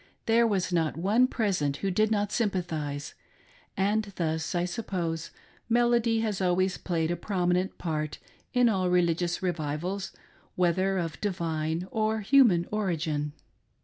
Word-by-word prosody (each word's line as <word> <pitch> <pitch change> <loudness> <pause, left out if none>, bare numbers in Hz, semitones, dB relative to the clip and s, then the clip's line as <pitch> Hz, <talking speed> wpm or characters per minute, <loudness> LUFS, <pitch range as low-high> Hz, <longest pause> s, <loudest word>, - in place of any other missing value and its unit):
There 230 +1 +4
was 190 -4 0
not 160 -3 +1
one 210 +9 +3
present 185 - 0
who 195 +3 -1
did 215 +4 +2
not 205 -2 0
sympathise. 160 -9 -2 0.6
And 205 +2 +1
thus, 160 0 -2
I 175 0 +1
suppose, 175 -4 -3 0.4
melody 235 -1 +3
has 210 -3 -1
always 185 +1 +2
played 165 -2 -1
a - - 0
prominent 180 0 0
part 155 -3 -3 0.3
in 245 -1 +4
all 190 -5 +1
religious 175 0 +1
revivals, 175 +3 -2 0.4
whether 185 +2 +2
of 165 -4 -3
divine 165 -3 -2
or 220 0 0
human 210 -7 +5
origin. 160 -8 -1
180 Hz, 130 wpm, -28 LUFS, 165-210 Hz, 0.6 s, human